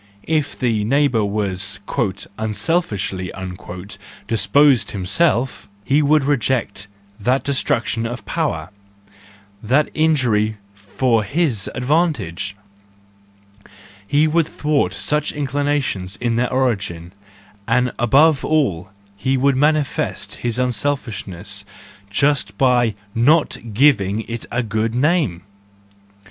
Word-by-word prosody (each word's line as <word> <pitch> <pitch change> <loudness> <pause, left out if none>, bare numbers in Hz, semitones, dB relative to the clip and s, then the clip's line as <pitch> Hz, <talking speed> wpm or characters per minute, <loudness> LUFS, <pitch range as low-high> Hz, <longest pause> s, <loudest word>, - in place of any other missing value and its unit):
If 155 -3 0
the 115 -5 0
neighbour 130 -1 +2
were 100 -2 -1 0.8
"unselfishly" 105 - -1 1.0
disposed 115 +3 +3
himself, 120 - 0 0.2
he 140 +3 +3
would 150 0 +3
reject 125 -6 -1 0.3
that 125 +5 +1
destruction 120 -4 0
of 120 -1 -7
power, 80 +3 -2 0.9
that 130 +7 +1
injury 120 -9 +2 0.2
for 110 +4 0
his 125 - 0
advantage, 125 - 0 1.5
he 145 +7 +3
would 160 0 +2
thwart 145 - 0
such 150 +7 0
inclinations 140 -9 -1
in 120 -2 -1
their 120 +1 0
origin, 100 -10 -1 0.5
and 125 +2 +2
above 140 +5 +4
all 100 - 0 0.3
he 130 +7 0
would 135 +1 +3
manifest 150 +1 0
his 120 -1 -2
unselfishness 110 -7 -2 0.5
just 145 +7 0
by 120 -4 +3 0.2
not 145 +7 +3 0.2
giving 110 -4 +3
it 115 0 -7
a 120 +1 0
good 110 +1 -1
name! 145 - +1
125 Hz, 100 wpm, -20 LUFS, 105-145 Hz, 1.5 s, above